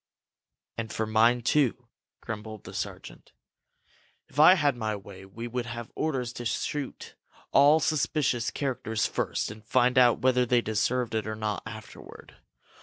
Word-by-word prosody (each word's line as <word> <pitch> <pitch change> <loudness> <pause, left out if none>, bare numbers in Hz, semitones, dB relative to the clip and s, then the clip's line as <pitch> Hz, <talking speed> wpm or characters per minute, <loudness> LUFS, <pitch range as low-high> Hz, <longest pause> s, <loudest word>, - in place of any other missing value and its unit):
"And 110 -1 -4
for 110 - -2
mine, 115 +3 +3
too!" 125 -3 +1 0.3
grumbled 110 -2 -7
the - - -10
sergeant. - - -7 1.0
"If 145 - -7
I 170 +5 +9
had 145 -6 +2
my 110 -3 -2
way, 95 -1 -11
we 115 +5 -7
would 120 0 -3
have 115 0 -7
orders 130 -6 -2
to 120 - -7
shoot 135 +4 -3 0.4
all 145 +3 +6
suspicious 150 -5 0
characters 115 -5 -2
first - - -2
and 105 0 -12
find 125 +2 +3
out 120 -2 +5
whether 125 -1 +4
they 120 0 +2
deserved 115 +2 -1
it 110 -1 -1
or 110 - -3
not 105 -1 -3
afterward. 110 0 -11
120 Hz, 150 wpm, -27 LUFS, 110-130 Hz, 1.0 s, I